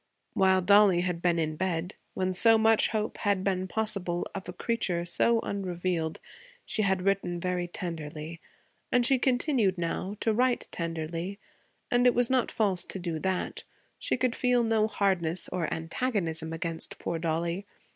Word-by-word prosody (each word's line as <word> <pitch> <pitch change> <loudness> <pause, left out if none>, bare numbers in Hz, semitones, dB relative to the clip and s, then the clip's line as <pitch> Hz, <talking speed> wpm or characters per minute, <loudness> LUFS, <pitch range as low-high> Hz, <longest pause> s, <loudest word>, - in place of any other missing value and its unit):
While 190 -1 +3
Dollie 200 -2 +6
had 180 -2 -2
been 175 -1 +2
in 155 -1 -1
bed, 180 +1 -2 0.2
when 185 0 0
so 225 +4 +5
much 220 0 +4
hope 215 -1 -2
had 200 -3 +1
been 190 -1 0
possible 195 -5 0
of 190 -2 -6
a - - -5
creature 180 -4 -1
so 230 +6 +2
unrevealed, 180 -5 -2 0.5
she 220 - -1
had 190 -2 +1
written 190 -3 0
very 180 0 -1
tenderly, 165 -2 -6 0.5
and 245 -1 +3
she 265 0 +3
continued, 250 - +2
now, 180 +4 -3
to 225 - +2
write 250 +2 +1
tenderly, 165 +3 -4 0.5
and 245 0 +4
it 245 - +4
was 245 0 +2
not 255 -2 +2
false 195 -5 +1
to - - -5
do 170 -3 -3
that; 190 +2 -2 0.4
she - - 0
could 255 -1 0
feel 250 -1 +2
no 220 -1 +2
hardness 185 -5 0
or 170 -3 -2
antagonism 165 -3 -2
against 165 0 -4
poor 170 - -3
Dollie. 170 +4 -2
185 Hz, 160 wpm, -28 LUFS, 170-215 Hz, 0.5 s, Dollie